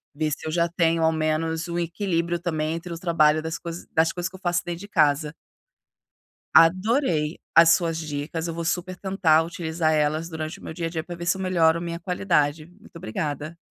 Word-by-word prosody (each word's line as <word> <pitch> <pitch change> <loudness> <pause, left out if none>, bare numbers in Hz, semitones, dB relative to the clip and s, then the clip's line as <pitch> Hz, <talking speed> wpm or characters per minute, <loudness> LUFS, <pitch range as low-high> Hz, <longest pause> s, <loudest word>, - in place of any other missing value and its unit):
ver 155 +1 -1
se 150 - -4
eu - - -2
já 170 +1 +2
tenho 165 -1 +1
ao 160 - +4
menos 160 +1 -1
um 170 0 -3
equilíbrio 170 -1 -1
também 160 -2 -2
entre 170 +1 -7
o 165 - -6
trabalho 155 -3 +3
das 160 +1 -4
cois 170 0 -7
das 160 +1 +3
coisas 175 0 -2
que 190 - -14
eu - - -11
faço 175 -1 +1
dentro 175 -1 -4
de 205 - -9
casa. 150 -4 +2 1.2
Adorei 180 - +3
as 165 0 +7
suas 165 -3 -1
dicas, 155 +2 -4
eu 165 - -3
vou 170 +1 -4
super 180 +2 -2
tentar 185 -5 +2
utilizar 165 -1 -1
elas 155 +2 0
durante 160 -1 -5
o - - -16
meu - - -6
dia 165 0 -3
a - - -4
dia 160 -1 -4
pra 175 +1 -7
ver 170 0 -7
se 180 +2 +1
eu - - -5
melhor 170 -3 +3
minha 170 0 -4
qualidade, 165 -5 0
muito 180 +3 -20
obrigada! 150 +3 -4
165 Hz, 210 wpm, -24 LUFS, 155-175 Hz, 1.2 s, as